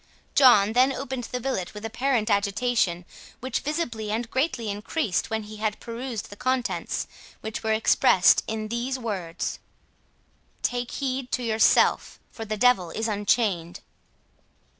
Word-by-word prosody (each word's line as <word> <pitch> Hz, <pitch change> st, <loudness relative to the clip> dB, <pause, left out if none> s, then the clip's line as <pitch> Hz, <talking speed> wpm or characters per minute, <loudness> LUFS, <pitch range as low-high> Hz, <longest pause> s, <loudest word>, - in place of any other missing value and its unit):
John 220 Hz, -6 st, +6 dB
then 255 Hz, +3 st, +4 dB
opened 265 Hz, -2 st, -4 dB
the 250 Hz, -, -4 dB
billet 225 Hz, -8 st, -3 dB
with 210 Hz, +1 st, -7 dB
apparent 230 Hz, 0 st, 0 dB
agitation, 200 Hz, -3 st, +1 dB, 0.3 s
which 260 Hz, +2 st, -2 dB
visibly 245 Hz, -9 st, -3 dB
and 225 Hz, +2 st, -2 dB
greatly 260 Hz, -4 st, -1 dB
increased 210 Hz, -, -2 dB
when 220 Hz, -1 st, -2 dB
he 215 Hz, +1 st, -10 dB
had 215 Hz, 0 st, -2 dB
perused 235 Hz, -2 st, -6 dB
the -, -, -8 dB
contents, 255 Hz, +2 st, -1 dB, 0.4 s
which 220 Hz, 0 st, -5 dB
were 220 Hz, -1 st, +1 dB
expressed 205 Hz, -4 st, +4 dB
in 215 Hz, -1 st, -3 dB
these 240 Hz, +3 st, -2 dB
words: 195 Hz, -9 st, -4 dB, 1.0 s
"_Take 245 Hz, 0 st, -1 dB
heed 265 Hz, -2 st, -3 dB
to 250 Hz, -, 0 dB
yourself 220 Hz, -1 st, +3 dB
for 225 Hz, -, -7 dB
the 215 Hz, 0 st, -3 dB
Devil 205 Hz, -7 st, +3 dB
is 220 Hz, +6 st, -2 dB
unchained! 200 Hz, -5 st, 0 dB
225 Hz, 140 wpm, -25 LUFS, 210-250 Hz, 1.0 s, John